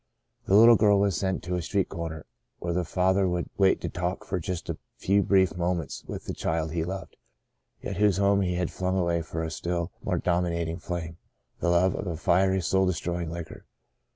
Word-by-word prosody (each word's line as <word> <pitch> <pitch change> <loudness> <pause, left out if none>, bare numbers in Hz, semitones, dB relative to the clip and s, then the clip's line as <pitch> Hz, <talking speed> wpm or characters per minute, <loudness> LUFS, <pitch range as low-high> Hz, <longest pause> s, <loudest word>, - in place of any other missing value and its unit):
The 95 - +4
little 115 +2 +8
girl 105 -1 +4
was 100 -3 +2
sent 95 +3 -1
to 90 - -4
a 90 - 0
street 95 +3 0
corner, 80 -2 -6 0.3
where 85 0 -3
the 90 +1 0
father 95 +2 +2
would 90 0 -2
wait 95 -1 +4
to - - -2
talk 90 +2 -3
for 90 - -2
just 90 +1 -4
a - - -4 0.2
few 100 +1 +2
brief 95 -3 +3
moments 85 -4 -2
with - - -6
the - - -4
child 80 -1 -2
he 80 -1 -1
loved, 95 +3 -6 0.7
yet 95 - -4
whose 105 -2 +3
home 100 0 +3
he 90 -2 0
had 90 -1 -1
flung 95 +1 -1
away 85 -2 +1
for 80 0 -4
a 80 - -3
still 85 +2 -3
more - - 0
dominating 85 -1 -1
flame 85 -2 -5 0.2
— - - -46
the 85 - 0
love 85 +2 +3
of - - -4
a 85 -2 -3
fiery, 95 +3 +2
soul 95 +2 +2
destroying 85 -1 -2
liquor. 85 -1 -8
90 Hz, 210 wpm, -27 LUFS, 85-95 Hz, 0.7 s, little